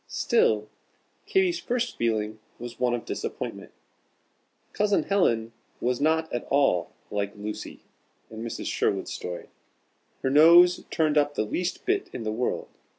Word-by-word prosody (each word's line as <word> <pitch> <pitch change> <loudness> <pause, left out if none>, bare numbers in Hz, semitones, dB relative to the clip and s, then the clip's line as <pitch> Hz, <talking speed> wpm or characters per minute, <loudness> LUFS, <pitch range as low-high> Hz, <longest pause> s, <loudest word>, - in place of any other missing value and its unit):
Still, 105 -1 +2 0.6
Katy's 380 -4 +2
first 245 -1 -2
feeling 110 -2 -1 0.2
was 120 0 -8
one 125 -1 +2
of 120 - -6
disappointment. - - -5 1.0
Cousin 205 -1 +2
Helen 115 - +1 0.3
was 125 +1 -1
not 160 +1 +1
at 120 - -3
all 135 -12 +2 0.2
like 100 0 -2
"Lucy," 105 +1 -6 0.5
in 110 0 -7
Mrs. 115 - -5
Sherwood's - - -1
story. 90 -1 -6 0.7
Her 130 - +1
nose 170 +4 +7
turned 155 -2 +2
up 145 0 0
the 110 - 0
least 180 - -3
bit 395 +2 0
in 115 - -5
the 110 - -2
world. 120 +3 -2
125 Hz, 140 wpm, -26 LUFS, 110-175 Hz, 1.0 s, nose